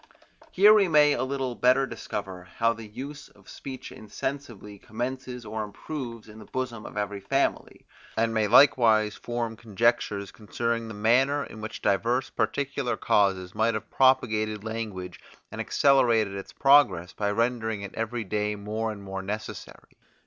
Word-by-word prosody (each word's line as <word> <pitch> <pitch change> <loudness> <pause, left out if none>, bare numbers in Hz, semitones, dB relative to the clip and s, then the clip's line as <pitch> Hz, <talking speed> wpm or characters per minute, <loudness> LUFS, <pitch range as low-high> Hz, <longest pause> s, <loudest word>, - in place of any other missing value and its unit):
Here 205 +3 +7
we 205 -3 +5
may 150 -2 +5
a 125 - -2
little 130 -1 -2
better 130 +3 +3
discover 100 -6 -6
how 115 0 +2
the 115 -1 -10
use 135 +7 -8
of - - -23
speech 130 -1 -8
insensibly 110 -2 -6
commences 125 +2 -5
or 110 +1 -4
improves 115 +1 -7
in 110 0 -12
the 105 - -11
bosom 125 -2 -4
of - - -10
every 105 -1 -2
family, 135 +8 -1 0.3
and 115 0 +1
may 110 -1 +1
likewise 110 -3 +5
from 120 -1 -4
conjectures 110 -3 0
concerning 115 +4 -3
the 110 - -8
manner 130 +7 +2
in 110 - -10
which 110 - -7
divers 120 +6 +1
particular 140 -2 -1
causes 95 -3 +1
might 115 0 +1
have 110 0 -6
propagated 110 -5 +2
language, 110 -5 -5 0.3
and - - -4
accelerated 120 -7 +3
its 100 0 -7
progress 105 -12 +4
by 100 -1 -1
rendering 110 -1 -1
it 100 - -7
every 115 +1 -3
day 105 +1 -1
more 110 +2 -3
and 100 -2 -9
more 95 0 -5
necessary. 105 +3 -7
115 Hz, 155 wpm, -26 LUFS, 105-130 Hz, 0.3 s, Here